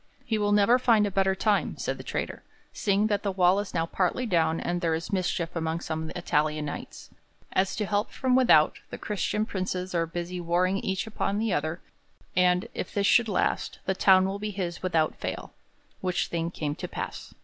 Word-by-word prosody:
'He 220 -2 0
will 205 0 +1
never 210 +4 +5
find 225 -4 +4
a 205 - -2
better 190 0 +2
time,' 210 +1 +1
said - - -3
the - - -7
traitor, - - -4 0.3
'seeing 200 0 +1
that 205 -2 +1
the 200 - -1
wall 185 +1 +4
is 205 -2 -5
now 165 -1 +1
partly 185 +8 0
down 165 -6 +1
and 175 0 -2
there 165 -2 +1
is 165 +5 -5
mischief 175 -2 -1
among 160 0 -1
some 160 -1 -4
Italian 155 -3 0
Knights. 145 - -7 0.4
As 190 0 +1
to 210 - -1
help 205 +2 0
from 255 -1 0
without, 195 -12 +5
the - - -6
Christian 210 +1 -1
princes 185 -2 -3
are 165 -1 +1
busy 175 +2 -4
warring 180 +3 +1
each 190 +1 -2
upon 205 -2 -2
the 220 -2 0
other, 155 +3 -2 0.5
and, 180 +3 +3
if - - -4
this 200 -2 0
should 230 +2 +4
last, 195 - 0
the 190 - +1
town 190 0 +5
will 195 +1 -3
be 210 +1 -3
his 180 -4 -4
without 165 -4 +1
fail,' - - -5 0.5
which 180 -1 -1
thing 165 0 -1
came 150 -4 -3
to - - -5
pass. - - -6
185 Hz, 200 wpm, -27 LUFS, 170-205 Hz, 0.5 s, never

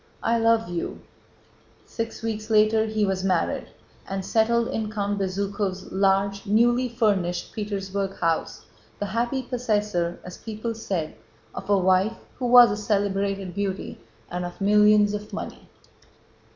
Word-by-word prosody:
* - - -23
"I 230 - +2
love 230 0 +3
you." 175 -1 -4 0.8
Six 230 -1 -5
weeks 220 -1 -3
later 220 0 +4
he 215 -1 +1
was 190 -1 -1
married, 185 -3 0 0.4
and 195 -1 -3
settled 230 +1 +2
in 220 -1 -3
Count 205 -1 -2
Bezúkhov's 195 0 -2
large, 195 +1 +1
newly 240 +4 +3
furnished 200 -7 0
Petersburg 200 -2 -3
house, 165 -2 -1 0.3
the 205 - -3
happy 240 +5 -1
possessor, 210 -8 -1
as 180 - -9
people 225 +1 -4
said, 190 -8 -3 0.4
of - - -8
a 200 - +5
wife 190 +4 +2 0.2
who 250 - -1
was 245 -1 +8
a 205 - -2
celebrated 200 -2 -1
beauty 200 -1 -3 0.3
and 180 0 -3
of 175 0 -7
millions 210 +1 +5
of 210 0 -6
money. - - -7
205 Hz, 140 wpm, -25 LUFS, 195-225 Hz, 0.8 s, was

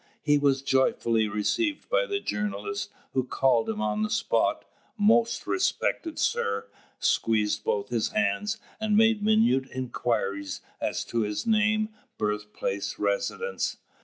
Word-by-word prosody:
He 145 -1 +4
was 140 -1 +2
joyfully 120 -4 +2
received 290 - -1
by - - +2
the 400 -2 -1
journalist, 400 - -3 0.2
who 130 - +2
called 125 -2 +2
him 110 -1 -2
on 105 0 0
the 110 - 0
spot, - - +1 0.3
"Most 230 +3 +3
respected 365 -3 0
sir," 460 -1 0 0.3
squeezed 105 -2 +1
both 100 - -1
his 115 -2 0
hands, 215 -1 0 0.2
and 215 -1 +2
made 225 -1 +4
minute 215 - +3
inquiries 115 -6 -2 0.2
as - - -1
to 115 - -2
his 105 -1 -1
name, 215 -1 +2 0.3
birthplace, 105 -1 -2
residence. 105 - -1
135 Hz, 130 wpm, -27 LUFS, -, 0.3 s, He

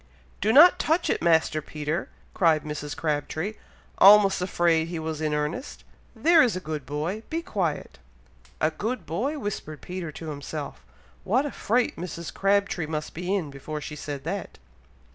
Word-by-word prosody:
"Do 215 - +3
not 320 +9 +8
touch 325 +3 +1
it, - - -1
Master 160 -2 +3
Peter!" 155 +3 -4 0.2
cried 160 -4 +3
Mrs. 150 -1 -5
Crabtree, 155 +5 -2 0.5
almost 200 -1 +7
afraid 170 -3 +2
he 170 0 -4
was 160 -1 -4
in 155 -1 0
earnest. 150 - -3 0.3
"There 335 0 +5
is 245 -5 +3
a - - -2
good 155 -6 -5
boy, 155 +9 -3
be 330 +1 -2
quiet!" 175 - -3 0.6
"A 155 - +2
good 225 +10 -4
boy!!" 240 - -2
whispered 195 - -5
Peter 180 -3 -5
to 160 +1 -7
himself. 145 - -6 0.4
"What 250 +9 +2
a 290 - -3
fright 240 +3 0
Mrs. 170 -1 -6
Crabtree 195 -4 +1
must 155 -1 -4
be 180 +4 -2
in, 165 -8 -2
before 150 +2 -6
she 150 +1 -7
said 145 -2 -6
that!" 185 +5 -5
165 Hz, 160 wpm, -26 LUFS, 155-200 Hz, 0.6 s, not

